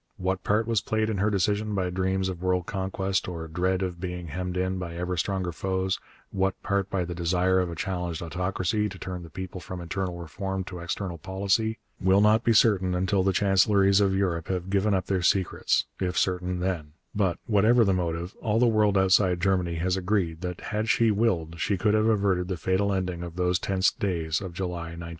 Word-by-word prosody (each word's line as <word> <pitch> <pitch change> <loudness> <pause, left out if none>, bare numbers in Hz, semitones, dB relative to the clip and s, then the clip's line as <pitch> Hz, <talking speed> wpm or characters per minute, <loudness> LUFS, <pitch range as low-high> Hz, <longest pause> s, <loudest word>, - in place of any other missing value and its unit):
What 95 0 -2
part 105 +2 +2
was 115 -3 +1
played 110 +1 0
in 100 - -2
her 105 +2 +2
decision 105 +1 0
by 90 -2 -1
dreams 95 +1 0
of 90 -2 -5
world 90 -1 +1
conquest 95 0 -2
or 85 -2 -5
dread 90 +3 0
of 90 -2 -4
being 90 -2 -5
hemmed 90 +3 -3
in 95 0 -1
by 85 -2 -5
ever 90 +1 -2
stronger 90 +1 -1
foes, 95 +2 -1 0.3
what 95 0 0
part 100 -1 0
by 95 -3 -1
the 90 - -5
desire 90 +2 +2
of 90 -1 0
a 85 - -5
challenged 90 -2 -3
autocracy 95 +5 -1
to 95 - -9
turn 90 -1 -6
the 85 - -10
people 95 +2 -7
from 90 0 -7
internal 90 +1 -3
reform 95 +3 -4
to 90 -1 -8
external 85 0 -4
policy, 100 +5 0 0.2
will 95 +1 +4
not 105 +2 +4
be 115 - +3
certain 95 -5 +4
until 95 +2 +1
the 95 +1 +2
chancelleries 100 +1 +4
of 95 -1 +2
Europe 90 -4 0
have 95 0 -3
given 100 +1 +2
up 95 - -1
their 95 -2 0
secrets, 95 +1 +1
if 90 -2 -1
certain 90 0 0
then; 85 -5 -2 0.2
but, 95 -4 +1
whatever 110 +2 +4
the 100 - +3
motive, 85 0 -2
all 110 0 +1
the 125 - +4
world 105 -3 +3
outside 95 -1 +4
Germany 90 -2 +1
has 90 +3 0
agreed 90 -4 -1
that 90 -1 -5
had 110 +1 -1
she 115 -2 +4
willed 85 -7 0
she 100 - 0
could 105 +3 +2
have 110 0 +3
averted 100 -5 +2
the 95 -1 -3
fatal 95 +3 +1
ending 90 -2 -2
of 85 -1 -7
those 90 -1 +1
tense 95 0 +2
days 85 -5 -1
of 95 -3 -5
July 85 -3 -4
1914. 85 0 -7
95 Hz, 205 wpm, -26 LUFS, 90-100 Hz, 0.3 s, will